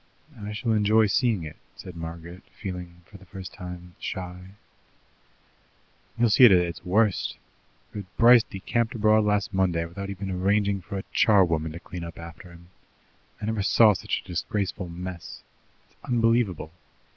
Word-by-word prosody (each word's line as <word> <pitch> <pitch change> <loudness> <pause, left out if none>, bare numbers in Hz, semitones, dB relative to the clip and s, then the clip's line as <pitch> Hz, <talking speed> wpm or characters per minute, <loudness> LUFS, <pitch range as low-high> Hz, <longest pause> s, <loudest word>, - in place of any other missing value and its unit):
"I 105 -2 -7
shall 110 +2 -2
enjoy 110 +1 +4
seeing 105 -2 +1
it," 75 -2 -8 0.2
said 90 - -10
Margaret, 85 +2 -8 0.2
feeling, 90 -3 -7
for 100 +1 -15
the 95 - -16
first 95 -2 -9
time, 90 -1 -9
shy. 90 +1 -7 1.6
"You'll 115 -2 +3
see 120 - +6
it 115 - +8
at 95 - +7
its 85 -1 -2
worst, 100 +2 +1 0.6
for 100 - -5
Bryce 120 +1 +8
decamped 115 +4 -2
abroad 110 -1 +3
last 105 0 0
Monday 90 -3 +1
without 100 +4 -7
even 100 0 -5
arranging 100 +2 +1
for 100 +3 -6
a 95 - -4
charwoman 85 -7 +3
to 85 - -7
clear 90 -1 -8
up 85 - -11
after 85 +2 -10
him. 85 0 -16 0.7
I 105 - -5
never 110 -1 -1
saw 105 +2 +5
such - - -3
a - - -22
disgraceful 95 +1 -3
mess. 90 0 -8 0.4
It's - - -34
unbelievable. 115 - +1
95 Hz, 155 wpm, -26 LUFS, 90-105 Hz, 1.6 s, it